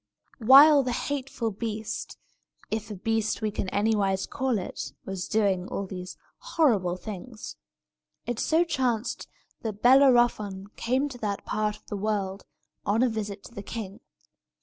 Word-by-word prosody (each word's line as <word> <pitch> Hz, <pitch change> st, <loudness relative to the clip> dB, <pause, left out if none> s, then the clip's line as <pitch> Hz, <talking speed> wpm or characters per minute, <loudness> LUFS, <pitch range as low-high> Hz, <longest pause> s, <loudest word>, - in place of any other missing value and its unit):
While 280 Hz, +5 st, +8 dB
the 250 Hz, -2 st, -2 dB
hateful 260 Hz, -3 st, -2 dB
beast 215 Hz, +1 st, -5 dB, 0.5 s
(if 220 Hz, 0 st, -3 dB
a 210 Hz, -, -5 dB
beast 220 Hz, +3 st, -1 dB
we 215 Hz, -, 0 dB
can 195 Hz, -, -3 dB
anywise 200 Hz, -2 st, +1 dB
call 260 Hz, -3 st, -1 dB
it) 185 Hz, -, -5 dB
was 190 Hz, -2 st, -4 dB
doing 195 Hz, -4 st, +1 dB
all 200 Hz, -, -3 dB
these 180 Hz, -1 st, -7 dB, 0.2 s
horrible 235 Hz, -, +2 dB
things, 215 Hz, +4 st, -8 dB, 0.7 s
it 240 Hz, -2 st, -3 dB
so 325 Hz, +2 st, +3 dB
chanced 255 Hz, -8 st, -1 dB, 0.3 s
that 215 Hz, -2 st, -5 dB
Bellerophon 240 Hz, -7 st, +4 dB
came 260 Hz, +4 st, 0 dB
to 250 Hz, -3 st, -10 dB
that 205 Hz, -3 st, -3 dB
part 210 Hz, 0 st, -1 dB
of -, -, -29 dB
the 205 Hz, -, -5 dB
world, 200 Hz, -2 st, -2 dB, 0.4 s
on 215 Hz, +4 st, +2 dB
a 255 Hz, -, +3 dB
visit 210 Hz, -3 st, -4 dB
to -, -, -13 dB
the 200 Hz, -, -6 dB
king. 205 Hz, -2 st, -6 dB
220 Hz, 150 wpm, -27 LUFS, 200-245 Hz, 0.7 s, While